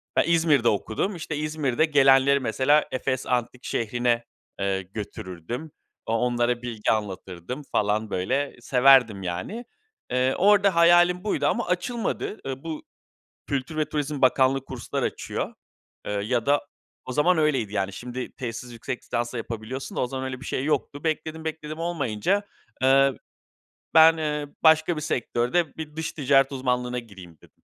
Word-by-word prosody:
ben - - +4
İzmir'de 160 -7 +3
okudum. 110 - -1
İşte, 155 -2 -5
İzmir'de 150 -2 0
gelenleri 140 -2 +5
mesela 130 +5 +2
Efes 130 0 -2
Antik 125 0 -2
Şehri'ne, 120 +1 0 0.4
eee, 95 -1 0
götürürdüm. 100 - -7 0.3
O 115 - -2
onlara 120 +1 +1
bilgi 115 -3 -1
anlatırdım 100 - -4
falan, 105 +1 0
böyle, 135 +11 -1
severdim 125 -5 +5
yani. 90 - -4 0.5
Eee, 130 +1 +2
orada 200 -1 +4
hayalim 175 +2 +5
buydu 215 - 0
ama 235 - 0
açılmadı. 210 +4 -2
Iıı, 135 0 -5
bu, 160 -2 -5 0.6
Kültür 140 +3 -3
ve 155 - +2
Turizm 150 -1 -3
Bakanlığı 130 +1 +3
kurslar 130 -4 -4
açıyor, - - -3 0.5
eee, - - -2
ya 110 +4 -1
da 145 0 +2 0.4
o 130 - -5
zaman 160 +5 +3
öyleydi. 135 -9 +1
Yani, 95 -1 -1
şimdi 125 +4 -6
tezsiz 120 0 -6
yüksek 120 +2 -5
lisansla 120 0 -3
yapabiliyorsun 115 +3 -6
da - - 0
o 125 - +1
zaman 130 +1 -5
öyle 130 -1 -5
bir - - -10
şey 130 - -2
yoktu. 145 -1 -1
Bekledim, 160 0 -2
bekledim 155 -1 -5
olmayınca, 165 - -1 0.4
eee, 135 +1 +5 0.8
ben, 160 +1 +8
eee, 150 -2 -2 0.2
başka 160 +1 +5
bir - - -3
sektörde 135 +2 0
bir 155 -1 -7
dış 160 0 -3
ticaret 135 -1 +3
uzmanlığına 125 -1 -1
gireyim, 95 -8 -11
dedim. - - -19
130 Hz, 150 wpm, -25 LUFS, 120-155 Hz, 0.8 s, ben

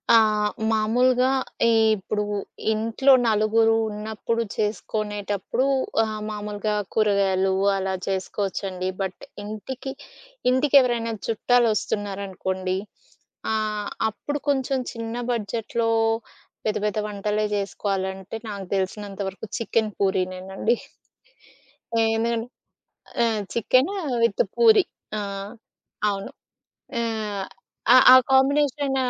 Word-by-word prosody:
ఆ! - - +9 0.5
మామూలుగా 250 +4 +3 0.6
ఇప్పుడు 210 +1 -2 0.5
ఇంట్లో 230 +5 +3
నలుగురు 225 +1 +3
ఉన్నప్పుడు 220 +2 -2
చేసుకునేటప్పుడు, 210 +1 -2 0.4
ఆహ్, 215 -1 -4
మామూలుగా 210 0 -3 0.2
కూరగాయలు 195 -3 +2 0.3
అలా 190 0 -1
చేసుకోవచ్చండి. 190 -1 -2
బట్ 190 -1 -4 0.2
ఇంటికి 245 +6 -6 0.6
ఇంటికెవరైనా 255 -4 +3
చుట్టాలు 240 +2 +3
వస్తున్నారనుకోండి. 190 -2 -2 0.8
ఆహ్, 215 -1 -1 0.2
అప్పుడు 290 +7 -4
కొంచెం 270 -1 +1 0.2
చిన్న 230 0 -5 0.2
బడ్జెట్‌లో 230 0 -1 0.8
పెద్ద 215 - +1
పెద్ద 210 0 -1
వంటలే 210 +1 -1
చేసుకోవాలంటే, 195 0 -3
నాకు 200 -2 -5
తెలిసినంత 195 +1 -3
వరకు 195 +3 -9
చికెన్ 220 -1 0
పూరినేనండి. 190 +3 0 1.2
ఆ! - - +2 0.2
ఎందుకంటే 230 +1 -1 0.8
ఆ! - - +5 0.3
Chicken 255 - +3 0.3
with 230 - +3
puri. 445 -4 +6 0.3
ఆ! - - -1 0.9
అవును. 195 -1 -3 0.7
ఆహ్, 215 -4 -2 0.7
ఆ - - +11 0.2
కాంబినేషన్ 275 0 +3
215 Hz, 85 wpm, -24 LUFS, 200-235 Hz, 1.2 s, ఆ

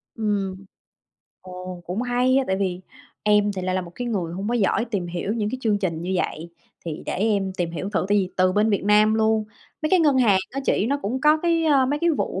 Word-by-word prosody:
Ừm. 205 -3 -1 0.9
Ồ, 185 -1 -8
cũng 185 +7 -2
hay 250 +1 +2
á, 270 - +3
tại 190 - 0
vì 185 -2 -2 0.4
em 210 -1 +3
thì 185 -2 -5
lại 185 0 -1
là 185 - +1
một 175 -2 -9
cái 245 - -4
người 180 -7 -2
hông 195 +4 -4
có 240 - 0
giỏi 225 0 +1
tìm 200 -7 -3
hiểu 175 +4 -3
những 210 -2 -1
cái 260 - -4
chương 215 -4 +1
trình 170 -5 -2
như 185 +2 -3
vậy. 170 -1 -3 0.3
Thì 160 -3 -5
để - - -2
em 200 -1 0
tìm 175 -2 -1
hiểu 170 +4 -5
thử, 205 - 0
tại 205 0 +3
vì 185 -1 -1
từ 185 0 +3
bên 210 +3 +2
Việt 200 -2 0
Nam 210 +1 +4
luôn, 220 0 +2 0.4
mấy 310 - 0
cái 370 - +5
ngân 290 -5 +3
hàng 210 -6 +4
á 275 - -4
chị, 210 - +1
nó 280 +3 0
cũng 245 +6 -2
có 300 +2 +5
cái, 335 -1 +2
a, 280 -4 +4
mấy 290 +3 -1
cái 340 - +3
vụ 310 - -2
205 Hz, 250 wpm, -23 LUFS, 185-245 Hz, 0.9 s, cái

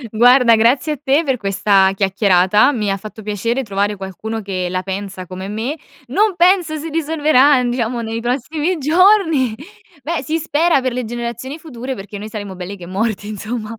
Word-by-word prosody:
Guarda 245 +1 +6
grazie 245 +7 +2
a - - -6
te 285 +3 +2
per 265 -3 0
questa 195 -2 +2
chiacchierata, 195 +4 +3
mi 210 -7 -1
ha 195 - -1
fatto 215 +2 -10
piacere 230 +5 -2
trovare 205 -1 -1
qualcuno 205 +3 -6
che 185 -2 -3
la 185 +1 -2
pensa 195 -1 -5
come 185 +1 -7
me, 225 +8 -3 0.3
non 400 - +1
penso 350 -2 +3
si 315 +2 -6
risolverà, 295 -4 +3
diciamo 240 -1 -1
nei 225 0 -4
prossimi 295 +8 -1
giorni. 320 - +3 0.5
Beh 330 -1 -2
si 310 +5 -2
spera 325 -1 +1
per 255 -1 -2
le 250 +1 -2
generazioni 240 +4 -5
future, 265 -5 -7
perché 205 -1 -8
noi 215 +1 -7
saremo 205 -3 -7
belli 185 +2 -7
che 180 - -10
morti 205 +3 -2
insomma. 215 +2 -5
235 Hz, 175 wpm, -18 LUFS, 200-290 Hz, 0.5 s, Guarda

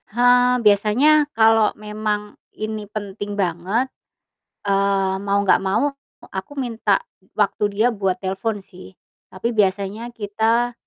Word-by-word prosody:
Ha, 245 +2 +4
biasanya 250 +9 +4
kalo 220 -1 +5
memang 210 0 -3 0.2
ini 215 -1 -5
penting 205 -1 -6
banget, 190 +6 0 0.8
eee, 195 -1 +1
mau 200 0 0
enggak 195 - +4
mau 215 +9 +1 0.3
e - - -10
aku 190 +9 -6
minta 230 -7 0 0.3
waktu 210 0 0
dia 220 +4 +3
buat 195 -4 -1
telepon 195 +2 -2
sih. 185 0 -14 0.3
Tapi 210 +6 -3
biasanya 205 +2 0
kita, 225 +3 0
210 Hz, 120 wpm, -21 LUFS, 195-230 Hz, 0.8 s, kalo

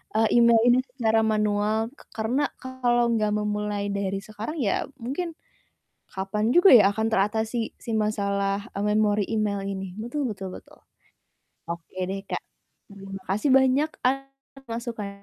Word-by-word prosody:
eee, 225 +2 +4
email 235 -1 +6
ini 245 +1 +6 0.2
secara 225 -3 +2
manual. 215 +1 +1
K 290 - -24 0.2
karena 235 +6 0 0.2
kalau 245 -2 +1
nggak 215 -2 +1
memulai 210 -1 -2
dari 195 -1 -2
sekarang, 215 +7 -6
ya 205 -6 0
mungkin 300 +8 -4 0.7
kapan 195 +3 -2
juga 355 +2 +7
ya 210 -4 +8
akan 220 +1 -1
teratasi 220 +3 +1 0.2
si 230 - -7
masalah, 200 -1 0
eee, 200 - -3
memori 210 -1 +2
email 210 -2 0
ini, 195 -2 -5
betul 270 +5 -3
betul 195 -2 -5
betul. - - -15 0.9
Oke 170 +1 -7 0.2
deh, 195 0 -3
Kak. - - -4 0.5
Terima 195 -1 -9
kasih 215 +8 +1
banyak 270 +3 +4 0.2
atas 270 +1 -1 0.4
masukan 230 -3 -4
215 Hz, 140 wpm, -25 LUFS, 200-240 Hz, 0.9 s, ya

